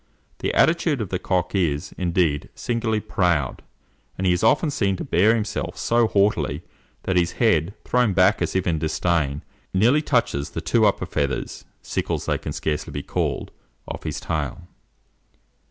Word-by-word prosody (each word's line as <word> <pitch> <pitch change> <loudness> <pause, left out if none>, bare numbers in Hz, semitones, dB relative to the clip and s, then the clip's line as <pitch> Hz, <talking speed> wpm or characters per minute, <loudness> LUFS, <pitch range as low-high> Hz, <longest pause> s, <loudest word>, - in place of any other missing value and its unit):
The - - -1
attitude 160 -3 +3
of 105 -5 -3
the 90 - -2
cock 90 -2 -1
is, 85 -5 0
indeed, 85 -5 0
singularly 115 -2 -1
proud; 85 -11 0 0.6
and 95 - -2
he 90 - +4
is 90 - -1
often 145 +7 +3
seen 100 -9 +1
to - - -5
bear 105 +7 +3
himself 105 -2 -3
so 120 -1 +2
haughtily, 85 -8 +1 0.4
that 95 -1 0
his 85 -1 +2
head, 100 -5 +2
thrown 125 -5 +2
back 95 +3 +4
as - - -1
if 95 - +1
in 80 -3 0
disdain, 80 -2 0 0.3
nearly 120 +10 +4
touches 120 - 0
the - - -5
two 105 +8 +3
upper 100 - 0
feathers 70 -2 -3 0.2
sickles - - -2
they - - 0
can - - -5
scarcely 75 -1 -2
be 70 - -5
called - - -2 0.4
of - - -6
his - - -4
tail. 80 +3 -4
95 Hz, 165 wpm, -23 LUFS, 80-110 Hz, 0.6 s, he